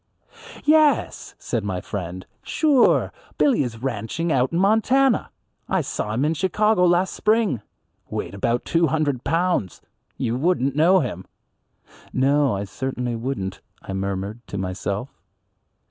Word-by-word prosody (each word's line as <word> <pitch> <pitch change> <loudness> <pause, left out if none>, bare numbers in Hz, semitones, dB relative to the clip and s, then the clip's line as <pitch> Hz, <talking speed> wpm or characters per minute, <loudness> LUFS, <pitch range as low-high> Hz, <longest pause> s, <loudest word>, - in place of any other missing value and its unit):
"Yes," 305 -1 +3
said 115 -4 -3
my 95 -3 -2
friend, 90 -1 -6 0.2
"sure 290 -6 +3 0.2
Billy 275 - +3
is 120 -3 -4
ranching 135 +7 -2
out 130 -2 +2
in 170 - -1
Montana. 225 +7 +3 0.4
I - - +2
saw 105 +1 -3
him 130 +5 +1
in 155 - +2
Chicago 190 +2 +2
last 175 +2 +2
spring, 215 - +1 0.5
weighed - - -4
about 115 +4 -1
two 165 -1 +2
hundred 145 -4 0
pounds, 165 - 0 0.4
you 115 - -1
wouldn't 140 -3 +1
know 175 +5 +5
him." 90 - -5 0.8
"No, 140 -1 +2
I 100 - -3
certainly 125 +3 -3
wouldn't," 115 -6 -4 0.2
I - - -6
murmured 100 +3 -3
to 100 - -5
myself. 100 +6 -4
135 Hz, 130 wpm, -23 LUFS, -, 0.8 s, know